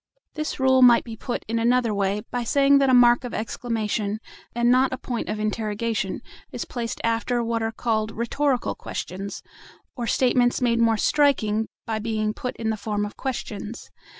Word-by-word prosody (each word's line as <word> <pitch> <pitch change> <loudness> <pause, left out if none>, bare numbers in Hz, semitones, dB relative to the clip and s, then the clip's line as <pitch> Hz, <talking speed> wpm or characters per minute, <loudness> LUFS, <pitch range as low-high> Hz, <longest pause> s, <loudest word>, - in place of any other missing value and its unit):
This 305 -2 -4
rule 260 0 +4
might 240 -2 +7
be 230 -2 -8
put 240 +2 -4
in 230 +1 -1
another 235 -1 +2
way 200 +1 0
by 245 -1 -1
saying 280 +3 +4
that 275 -1 +3
a - - +4
mark 240 0 +6
of 245 - -5
exclamation, 215 -2 -2 0.4
and 240 0 +3
not 255 +1 +4
a 260 - -3
point 245 -2 -4
of 210 0 -2
interrogation, 215 -1 -2 0.3
is - - -4
placed 235 -2 -4
after 230 +1 0
what 230 0 -1
are 225 0 -1
called 220 -1 -1
rhetorical 245 +4 -1
questions, 195 +2 -6 0.5
or 240 -3 -4
statements 245 0 +2
made 235 -2 +2
more 225 -1 +3
striking 225 -7 +2 0.2
by 220 -1 -2
being 215 -1 -1
put 250 +3 -5
in 220 -1 -2
the 220 - -3
form 205 0 -2
of 205 - -8
questions. 230 -4 -5
230 Hz, 180 wpm, -24 LUFS, 215-245 Hz, 0.5 s, might